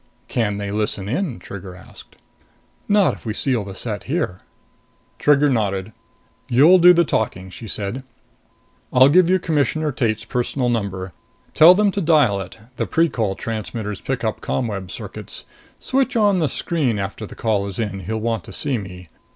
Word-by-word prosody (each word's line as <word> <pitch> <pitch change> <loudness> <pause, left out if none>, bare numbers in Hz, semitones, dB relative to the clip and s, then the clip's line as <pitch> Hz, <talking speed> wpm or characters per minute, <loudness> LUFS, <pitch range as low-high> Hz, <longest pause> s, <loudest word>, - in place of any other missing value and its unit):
"Can 105 -5 -1
they 100 -1 -4
listen 105 -2 -1
in?" 135 - -2
Trigger 95 0 -9
asked. 95 - -15 0.7
"Not 205 -2 +3
if - - -12
we 110 - -3
seal 125 -1 +1
the 95 -1 -8
set - - -5
here." 90 +1 -2 0.8
Trigger 145 0 +4
nodded. 105 -5 -1 0.6
"You'll 155 +10 +6
do 175 +1 +8
the 170 -1 +4
talking," 95 -8 -2
she 110 - -9
said. 105 +6 -4 0.9
"I'll 130 +2 +6
give 175 +3 +5
you 185 - +4
Commissioner 155 -2 0
Tate's 110 -5 -1
personal 125 +1 -1
number. 95 -6 -3 0.4
Tell 170 +3 +8
them 205 0 +3
to 200 - -2
dial 145 - +3
it. 95 +2 -9 0.2
The - - -1
Precol 115 -12 0
transmitters 110 -2 -5
pick 130 -3 -3
up 110 -1 -2
ComWeb 100 -7 -3
circuits. - - -7 0.4
Switch 265 -1 0
on 205 -4 +3
the 155 -4 +1
screen 145 -10 -1
after 100 +2 -5
the - - -12
call 105 -3 0
is 100 - -5
in; 105 -4 -3
he'll 105 +5 -4
want 115 -3 -2
to - - -10
see 140 -5 -2
me. 90 -3 -10
115 Hz, 165 wpm, -21 LUFS, 100-150 Hz, 0.9 s, do